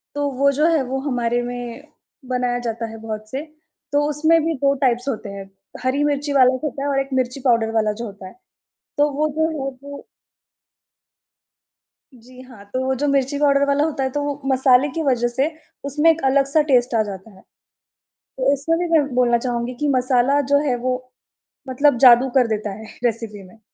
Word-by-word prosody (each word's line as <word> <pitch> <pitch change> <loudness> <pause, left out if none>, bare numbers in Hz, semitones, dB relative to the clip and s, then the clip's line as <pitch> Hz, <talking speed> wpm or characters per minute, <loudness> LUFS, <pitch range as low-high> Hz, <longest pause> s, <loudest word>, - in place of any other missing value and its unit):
तो 290 0 0
वो 280 +1 +4
जो 300 +4 +2
है 305 - +2
वो 260 +1 -3
हमारे 245 -3 -1
में 245 +1 -6 0.5
बनाया 250 -1 -1
जाता 230 0 -3
है 225 - -9
बहुत 215 -1 -6
से। 270 +2 -4 0.5
तो 290 - +3
उसमें 315 +3 +3
भी 330 0 0
2 275 +1 +2
टाइप्स 245 +1 +1
होते 225 -5 -4
हैं, 195 -1 -9 0.3
हरी 260 +3 0
मिर्ची 290 0 -1
वाला 260 -2 +5
जो - - -11
होता 275 - -7
है 285 - -1
और 275 -1 +1
एक 270 - -4
मिर्ची 255 +1 -1
पाउडर 230 -3 +2
वाला 215 -1 +1
जो - - -3
होता 200 -2 -10
है। - - -16 0.6
तो 290 +1 +3
वो 300 +2 0
जो 320 0 +2
है 320 - -5 0.3
वो 285 0 -10 2.1
जी 250 +1 -16
हाँ, 250 -6 -14
तो 255 +6 -4
वो 265 0 0
जो 290 - +1
मिर्ची 275 0 0
पाउडर 280 -1 +3
वाला 280 +1 +2
होता 310 -4 -2
है 265 - -1
तो 290 +2 -2
वो 290 0 -4
मसाले 260 +1 +4
की 330 - -2
वज़ह 240 -3 +2
से 260 +5 0 0.4
उसमें 295 +4 +3
एक 325 0 0
अलग-सा 275 +3 +3
टेस्ट 245 -2 +3
आ 225 - +3
जाता 200 0 -8
है। 190 -2 -18 0.8
तो - - -2
इसमें 285 +4 0
भी 350 - -1
मैं 290 - +1
बोलना 245 -1 +3
चाहूँगी 240 0 -3
कि 295 - 0
मसाला 255 +2 +2
जो 285 - +6
है 250 - +1
वो 255 0 +1 0.7
मतलब 260 0 +2
जादू 245 +2 +7
कर 255 -3 +4
देता 215 -2 -3
है - - -9 0.2
रेसिपी 225 -3 -2
में। 225 - -19
260 Hz, 200 wpm, -21 LUFS, 240-285 Hz, 2.1 s, जादू